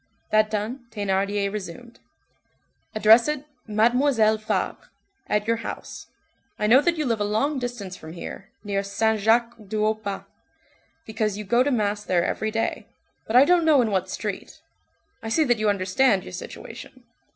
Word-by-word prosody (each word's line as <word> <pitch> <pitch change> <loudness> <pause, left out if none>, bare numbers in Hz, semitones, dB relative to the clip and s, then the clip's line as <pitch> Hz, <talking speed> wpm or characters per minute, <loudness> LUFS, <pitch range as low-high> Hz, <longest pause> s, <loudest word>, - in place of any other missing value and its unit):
That 215 0 +4
done, 225 +4 -4
Thénardier 200 -1 -1
resumed:— 210 +4 -8 1.0
"Address 220 +3 +6
it, 300 -1 -2 0.2
'Mademoiselle 220 0 +3
Fabre,' 215 - -3 0.4
at 210 0 0
your 230 +1 +1
house. 230 - -7 0.5
I 210 - -1
know 245 +6 +6
that 340 +1 +1
you 305 - -1
live 230 -4 0
a - - +3
long 225 +8 0
distance 240 -7 -5
from 160 -3 -10
here, 190 +3 -8
near 200 -2 -1
Saint 220 +2 0
Jacques 230 +3 +3
du 215 +2 -2
Haut 215 0 0
Pas, 200 -1 -4 0.8
because 215 -2 -2
you 210 - -5
go 235 +4 +2
to 275 - +2
mass 210 -5 0
there 180 -4 +1
every 220 - -1
day, 225 +1 -2 0.4
but 220 - -2
I 260 +3 +8
don't 355 +1 +4
know 310 -3 +5
in 220 - -1
what 190 -1 0
street. 210 -1 -5 0.6
I 225 - -5
see 315 +8 +3
that 240 -5 +1
you 215 -1 +2
understand 195 +2 +2
your 90 - -10
situation. - - -9
215 Hz, 170 wpm, -24 LUFS, 205-240 Hz, 1.0 s, I